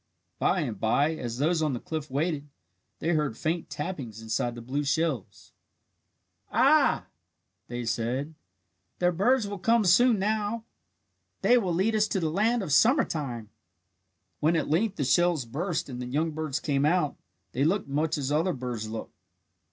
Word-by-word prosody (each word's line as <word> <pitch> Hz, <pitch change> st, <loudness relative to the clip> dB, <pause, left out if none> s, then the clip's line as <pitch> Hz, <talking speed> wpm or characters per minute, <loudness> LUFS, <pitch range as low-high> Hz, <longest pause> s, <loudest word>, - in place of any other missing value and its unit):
By 185 Hz, -, +2 dB
and 115 Hz, -9 st, -4 dB
bye, 140 Hz, +8 st, +2 dB
as 120 Hz, -6 st, -5 dB
those 160 Hz, +4 st, +1 dB
on 155 Hz, -3 st, +1 dB
the 120 Hz, -, -3 dB
cliff 155 Hz, +1 st, -5 dB
waited, 145 Hz, +1 st, -2 dB, 0.5 s
they 165 Hz, -, -2 dB
heard 150 Hz, -8 st, 0 dB
faint 165 Hz, +1 st, -2 dB
tappings 140 Hz, -, -5 dB
inside 115 Hz, +2 st, -2 dB
the -, -, -7 dB
blue 140 Hz, +5 st, -2 dB
shells. 145 Hz, -, -2 dB, 1.0 s
"Ah," -, -, +4 dB, 0.6 s
they 120 Hz, 0 st, -4 dB
said, 120 Hz, +6 st, -2 dB, 0.6 s
"the 180 Hz, 0 st, +2 dB
birds 210 Hz, +6 st, +2 dB
will 200 Hz, -1 st, -5 dB
come 230 Hz, +2 st, +3 dB
soon 230 Hz, +6 st, +5 dB
now. 215 Hz, +2 st, -1 dB, 0.8 s
They 245 Hz, -, +6 dB
will 200 Hz, -7 st, +1 dB
lead 200 Hz, +6 st, +2 dB
us 215 Hz, 0 st, +3 dB
to 195 Hz, -, -1 dB
the 160 Hz, -3 st, -1 dB
land 220 Hz, +5 st, +1 dB
of 165 Hz, -, -4 dB
summer 260 Hz, -, +5 dB
time." 120 Hz, -9 st, -5 dB, 0.9 s
When 160 Hz, +3 st, +2 dB
at 160 Hz, -, 0 dB
length 195 Hz, +6 st, +1 dB
the 145 Hz, -, -1 dB
shells 170 Hz, 0 st, +2 dB
burst 160 Hz, +9 st, -2 dB
and 125 Hz, -2 st, -6 dB
the 125 Hz, -, -5 dB
young 155 Hz, +6 st, 0 dB
birds 155 Hz, -2 st, -3 dB
came 140 Hz, -2 st, 0 dB
out, 155 Hz, -1 st, +2 dB, 0.4 s
they 130 Hz, -, 0 dB
looked 185 Hz, +4 st, +1 dB
much 150 Hz, +3 st, 0 dB
as 140 Hz, -1 st, -2 dB
other 165 Hz, +5 st, +2 dB
birds 120 Hz, -5 st, -4 dB
look. 110 Hz, 0 st, -6 dB
155 Hz, 165 wpm, -27 LUFS, 130-185 Hz, 1.0 s, They